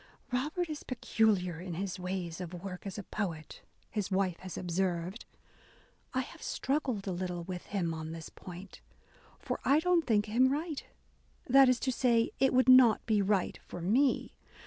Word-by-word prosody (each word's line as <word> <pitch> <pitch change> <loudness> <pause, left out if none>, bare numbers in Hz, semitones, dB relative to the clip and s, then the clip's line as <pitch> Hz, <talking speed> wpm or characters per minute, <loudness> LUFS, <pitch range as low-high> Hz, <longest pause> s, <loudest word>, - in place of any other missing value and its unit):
''Robert 305 +8 0
is 305 -2 -5
peculiar 210 -8 +1
in 180 -1 -5
his 190 +1 -3
ways 180 -2 -4
of 180 0 -6
work 180 +2 -7
as 195 - -6
a 205 - -5
poet," 170 -7 -5 0.3
his 205 -3 -2
wife 190 -3 0
has 185 -1 -7
observed, 180 +2 -2 0.9
"I 260 - 0
have - - -10
struggled 265 -7 -1
a 195 - -2
little 180 -1 -3
with 180 0 -6
him 175 -5 -1
on 160 0 -5
this 165 -1 -7
point, 185 +1 -11 0.6
for - - -4
I 285 +2 +4
don't 350 0 +2
think 210 -3 +3
him 240 +5 +3
right; 305 +1 -2 0.6
that 270 +1 +7
is 250 -1 +3
to 260 - +1
say, 240 -2 +2
it 265 0 +4
would 255 0 +3
not 255 -4 +7
be 215 -3 +2
right 195 -2 0
for - - -7
mc. 240 +10 +2
200 Hz, 170 wpm, -31 LUFS, 180-255 Hz, 0.9 s, that